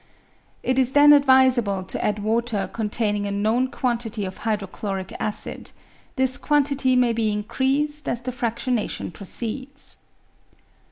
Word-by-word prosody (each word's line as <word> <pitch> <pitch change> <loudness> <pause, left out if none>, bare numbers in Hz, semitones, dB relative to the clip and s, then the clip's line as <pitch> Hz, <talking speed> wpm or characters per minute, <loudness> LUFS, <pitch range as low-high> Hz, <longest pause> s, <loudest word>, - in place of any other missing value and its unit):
It 260 +1 +1
is 260 0 +1
then 290 0 +8
advisable 260 -8 +4
to 185 - -4
add 210 0 -1
water 225 -1 0
containing 210 -2 -1
a - - -3
known 220 +5 +1
quantity 235 -5 -2
of 190 0 -7
hydrochloric 200 -2 -3
acid; 210 - -4 0.5
this 260 0 +1
quantity 280 -3 +2
maybe 230 -3 +2
increased 270 +8 -1
as 235 0 -2
the 255 - -3
fraftionation 235 -5 -2
proceeds. 260 +7 -5
235 Hz, 120 wpm, -23 LUFS, 210-260 Hz, 0.5 s, then